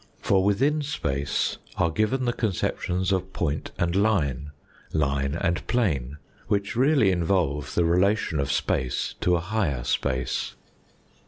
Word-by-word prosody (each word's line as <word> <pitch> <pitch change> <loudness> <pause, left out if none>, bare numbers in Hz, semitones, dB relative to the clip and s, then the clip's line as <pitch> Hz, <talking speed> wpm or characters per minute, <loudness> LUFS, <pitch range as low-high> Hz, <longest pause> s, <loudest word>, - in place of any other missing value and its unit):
For 95 -1 +2
within 135 +10 +2
space 70 - -1 0.2
are 85 - +2
given 115 +8 0
the 120 - +1
conceptions 95 -3 -1
of 95 0 -1
point 75 -3 -2
and 85 0 0
line, 80 - +1 0.4
line 70 -1 0
and 85 -2 -1
plane, 75 - 0 0.3
which 100 +2 -1
really 130 -5 +4
involve 85 -5 0
the 85 - +3
relation 90 -1 +2
of 70 0 0
space 65 -1 -1
to 90 - +3
a - - +1
higher 85 - -1
space. 65 +1 -1
90 Hz, 135 wpm, -25 LUFS, 75-105 Hz, 0.4 s, really